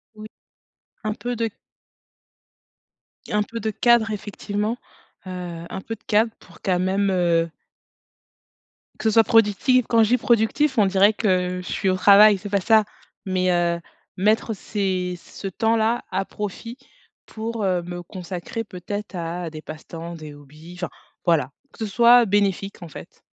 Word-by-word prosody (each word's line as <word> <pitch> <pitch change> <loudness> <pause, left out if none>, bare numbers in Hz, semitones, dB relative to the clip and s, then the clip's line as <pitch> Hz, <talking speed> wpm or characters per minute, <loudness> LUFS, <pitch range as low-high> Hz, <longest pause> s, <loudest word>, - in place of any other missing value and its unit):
Oui 215 0 -9 0.8
un 215 0 -1
peu 245 +1 -4
de 230 0 0 1.8
un 210 0 +2
peu 230 +2 -7
de 220 - -1
cadre 235 0 +3
effectivement, 210 +1 -3 0.5
heu, 175 -2 -6
un 190 - -5
peu 225 +3 -5
de - - -29
cadre 220 +1 +2
pour 170 -2 -18
quand 180 -2 +1
même, 195 +2 +1
heu 170 -2 +2 1.5
Que - - -7
ce - - -1
soit 225 - +7
productif, 225 +3 +3
quand 230 -1 +5
je 215 - +1
dis: 250 - +4
«productif», 235 +5 +2
on 210 - +5
dirait 195 +2 +4
que 180 -4 0
je - - -7
suis 195 - 0
au 185 - +2
travail, 205 +2 +7
c'est 205 +2 -8
pas 200 0 +2
ça, 220 +2 +5 0.4
mais 185 -1 +1
heu, 170 -1 +1 0.4
mettre 215 +3 +2
ces 185 -3 -2
ce 195 - -8
temps-là 225 +4 +1
à 195 - -1
profit 210 +5 -6 0.5
pour, 225 0 -5
heu, 180 -2 +1
me 175 0 -7
consacrer, 185 +4 -6
peut-être, 205 +1 -6
à 170 0 -4
des 155 -1 -9
passe-temps, 165 +2 -8
des 155 -2 -9
hobbies, 155 +5 -14
enfin, 175 0 -4 0.4
voilà. 155 -7 +2 0.2
Que - - -20
ce - - -4
soit 240 +2 +6
bénéfique, 200 -2 0
en 170 - -7
fait. - - -12
200 Hz, 160 wpm, -23 LUFS, 180-220 Hz, 1.8 s, soit